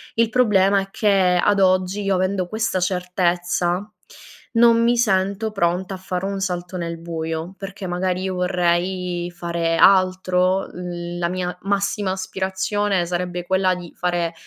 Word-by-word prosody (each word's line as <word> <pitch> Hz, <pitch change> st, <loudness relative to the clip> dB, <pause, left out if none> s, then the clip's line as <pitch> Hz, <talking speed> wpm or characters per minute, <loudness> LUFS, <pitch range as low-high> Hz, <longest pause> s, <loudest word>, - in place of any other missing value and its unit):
Il 230 Hz, 0 st, +2 dB
problema 200 Hz, -5 st, +3 dB
è 195 Hz, -, -7 dB
che 190 Hz, -4 st, +2 dB
ad 205 Hz, -, +3 dB
oggi 185 Hz, +1 st, +2 dB
io 195 Hz, -1 st, +1 dB
avendo 185 Hz, 0 st, 0 dB
questa 220 Hz, 0 st, -1 dB
certezza, 180 Hz, +1 st, 0 dB, 0.6 s
non 230 Hz, 0 st, +5 dB
mi 240 Hz, +1 st, +3 dB
sento 200 Hz, -1 st, +1 dB
pronta 180 Hz, -1 st, -1 dB
a -, -, -5 dB
fare 185 Hz, 0 st, -4 dB
un 195 Hz, 0 st, -3 dB
salto 180 Hz, -1 st, -3 dB
nel 170 Hz, -1 st, -4 dB
buio. 165 Hz, +1 st, -4 dB
Perché 195 Hz, -1 st, -7 dB
magari 180 Hz, +1 st, -1 dB
io 190 Hz, -1 st, -2 dB
vorrei 180 Hz, 0 st, 0 dB
fare 170 Hz, -1 st, -1 dB
altro, 185 Hz, 0 st, +3 dB
l 175 Hz, -1 st, -6 dB
la 170 Hz, -1 st, -1 dB
mia 180 Hz, 0 st, -3 dB
massima 200 Hz, 0 st, -1 dB
aspirazione 190 Hz, +1 st, -1 dB
sarebbe 175 Hz, 0 st, -3 dB
quella 190 Hz, 0 st, +2 dB
di 175 Hz, -2 st, -10 dB
fare, 175 Hz, -1 st, -1 dB
185 Hz, 145 wpm, -21 LUFS, 175-195 Hz, 0.6 s, non